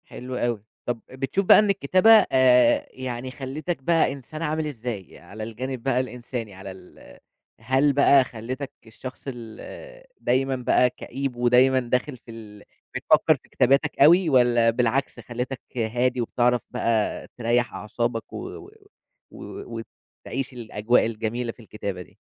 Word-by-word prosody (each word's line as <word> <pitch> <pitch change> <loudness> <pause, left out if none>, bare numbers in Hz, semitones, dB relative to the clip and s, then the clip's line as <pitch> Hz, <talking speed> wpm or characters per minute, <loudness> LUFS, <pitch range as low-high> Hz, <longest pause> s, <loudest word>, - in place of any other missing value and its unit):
حلو 125 +1 -8
أوي. 120 -4 -1 0.2
طَب 120 -2 -3
بتشوف 135 +9 -2
بَقى - - +8
إن 210 -1 +2
الكتابة 185 +2 +3 0.2
آآ، 125 -2 +4
يعني 130 0 -5
خَلِّتَك 140 +4 -5
بَقى 165 +2 +3
إنسان 140 +3 -8
عامل 155 0 -1
إزاي؟ 115 - -6
على 100 +5 -9
الجانب 120 +2 -5
بَقى 135 -2 +1
الإنساني، 120 -3 -5
على 95 0 -9
ال 95 -1 -15 0.4
هل 135 +4 +3
بَقى 140 -1 +5
خَلِّتَك 130 +4 -6 0.2
الشخص 125 +3 -10
ال 135 - -9 0.2
دايمًا 130 +2 +1
بَقى 125 0 +3
كئيب 135 +1 -5
ودايمًا 125 +2 +4
داخل 125 +2 -2
في 115 0 -14
ال 105 -2 -12 0.3
بتفكر - - +4
في - - -20
كتاباتك 135 +3 +2
أوي؟ 170 +4 +6
والّا 120 -3 +4
بالعكس 125 +2 0
خَلِّتَك 125 +3 -5 0.2
هادي 120 +2 0
وبِتِعرَف 120 +1 +1
بَقى 110 -2 -1
تِرَيَّح 120 0 0
أعصابك 115 +1 -3
و - - -5 0.2
و - - -13 0.6
و 115 -1 -8 0.4
وتعيش 135 +1 -4
الأجواء 115 -1 +1
الجميلة 115 +2 -3
في - - -23
الكتابة 100 -4 -6
دي؟ - - -15
125 Hz, 145 wpm, -24 LUFS, 115-135 Hz, 0.6 s, بَقى